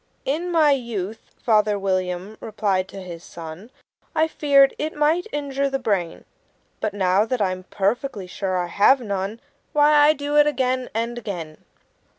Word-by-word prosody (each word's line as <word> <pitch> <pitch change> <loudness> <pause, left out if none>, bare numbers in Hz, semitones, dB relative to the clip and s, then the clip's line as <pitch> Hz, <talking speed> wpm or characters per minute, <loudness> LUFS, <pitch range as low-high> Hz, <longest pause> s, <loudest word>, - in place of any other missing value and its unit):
"In 330 +6 -1
my 315 -3 +4
youth," 225 -6 -2 0.2
Father 210 -2 +2
William 185 +1 -2
replied 205 -4 -1
to 195 -1 -9
his 170 -2 -9
son, 170 +6 -10 0.5
"I 315 0 +3
feared 280 -3 +4
it 310 +1 -3
might 310 +6 +1
injure 280 -1 -1
the 270 - -1
brain; 195 -9 -2 0.5
But 210 -2 -2
now 190 0 +3
that 245 +2 -2
I'm 185 -2 -1
perfectly 210 +2 -2
sure 185 +1 -3
I 180 - 0
have 205 +10 +4
none, 200 -1 -3 0.3
Why, 295 0 +5
I 295 +1 +6
do 290 0 -2
it 295 0 +6
again 255 -3 0
and 235 +1 -2
again." 170 -8 -7
220 Hz, 160 wpm, -23 LUFS, 190-280 Hz, 0.5 s, I